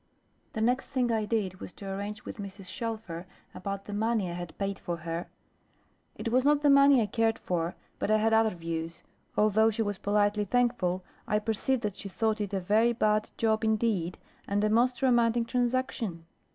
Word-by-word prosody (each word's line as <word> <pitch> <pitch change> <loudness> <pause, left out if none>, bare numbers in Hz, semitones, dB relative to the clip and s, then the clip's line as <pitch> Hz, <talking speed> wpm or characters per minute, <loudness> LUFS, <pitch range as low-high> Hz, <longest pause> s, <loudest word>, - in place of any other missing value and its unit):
The 220 - -3
next 250 +3 +1
thing 255 -3 0
I 220 -2 +1
did 200 -4 -1
was - - -8
to 200 - -9
arrange 205 +2 -5
with - - -7
Mrs. 200 -1 -8
Shelfer 215 -6 -5 0.3
about 195 +2 -5
the 205 - -6
money 215 -3 0
I - - -4
had 175 -1 -7
paid 195 0 -2
for 170 -1 -3
her. 165 +1 -4 0.9
It 230 - -4
was 255 +1 +3
not 295 +1 +3
the 290 - +6
money 275 -3 +6
I - - 0
cared 225 +2 +1
for, 170 -1 -2 0.2
but - - -1
I 215 - +5
had 225 +1 +2
other 220 0 +5
views. 165 0 -5 0.3
Although 215 +1 +4
she 225 +1 -1
was 205 -2 -3
politely 205 0 +2
thankful, 185 -5 +1 0.2
I 210 - +2
perceived 225 +4 0
that 205 -2 -2
she 200 - -6
thought 220 +2 0
it 205 - -3
a 195 - 0
very 215 +6 +3
bad 215 -2 +1
job 220 -1 +1
indeed, 215 -5 +1 0.3
and 205 +1 0
a 215 - +2
most 245 +3 +2
romantic 240 -2 +3
transaction. 245 -8 -1
215 Hz, 190 wpm, -29 LUFS, 195-230 Hz, 0.9 s, the